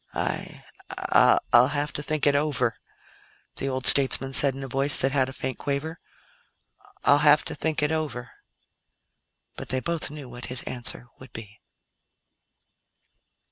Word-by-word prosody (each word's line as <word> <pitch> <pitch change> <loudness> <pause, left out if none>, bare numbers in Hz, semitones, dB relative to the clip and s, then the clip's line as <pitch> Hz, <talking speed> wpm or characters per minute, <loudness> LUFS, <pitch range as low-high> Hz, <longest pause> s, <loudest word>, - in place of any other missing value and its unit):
"I - - -4 0.9
I'll 120 +1 +7
have 145 +1 -3
to - - -4
think 150 0 -2
it 145 - +4
over," 140 -6 0 0.8
the 135 - -2
old 130 0 -4
statesman 135 -1 +5
said 135 0 +2
in 135 - -7
a - - -6
voice 135 +2 +1
that 135 - +3
had 130 -1 0
a - - -7
faint 130 -1 -6
quaver. 150 +4 -4 1.0
"I'll 145 - +5
have 150 0 +4
to - - -4
think 155 0 -2
it 150 - +1
over." 145 -6 -4 1.3
But - - -7
they 130 - 0
both 170 +3 -3
knew 145 -2 -10
what 120 0 -9
his 125 0 -2
answer 120 -1 -4
would 130 - -15
be. 110 -2 -11
135 Hz, 150 wpm, -25 LUFS, 130-150 Hz, 1.3 s, I'll